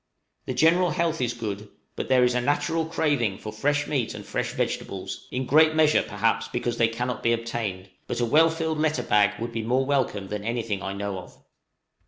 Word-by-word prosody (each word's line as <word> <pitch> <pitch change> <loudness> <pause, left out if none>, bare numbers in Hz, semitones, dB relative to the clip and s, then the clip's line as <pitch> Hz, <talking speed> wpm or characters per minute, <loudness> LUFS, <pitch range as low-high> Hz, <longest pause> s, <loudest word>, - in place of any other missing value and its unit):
The - - -2
general 175 +3 +4
health 165 -3 0
is 120 -1 -1
good, 105 -2 -5 0.3
but - - -4
there 130 -1 +5
is 125 0 +3
a 125 - +1
natural 160 +4 0
craving 145 -11 0
for 105 - -7
fresh 145 +6 0
meat 130 -7 -1
and - - -8
fresh - - -2
vegetables - - -4
in 130 +1 -3
great 155 +3 +5
measure, 155 -1 +4
perhaps, 115 +2 0
because 120 0 -2
they 115 - +4
cannot 120 0 -3
be 115 - +2
obtained; 110 -5 -4 0.2
but - - -3
a 120 - +2
well 155 +7 +5
filled 160 -1 -2
letter 155 0 +1
bag 105 -2 +2
would 115 +1 -4
be 115 -1 -3
more 125 +4 +1
welcome 125 -8 0
than 105 -1 -4
anything 115 -3 -2
I 100 0 -4
know 100 -1 -4
of. 90 - -13
120 Hz, 205 wpm, -25 LUFS, 110-150 Hz, 0.3 s, there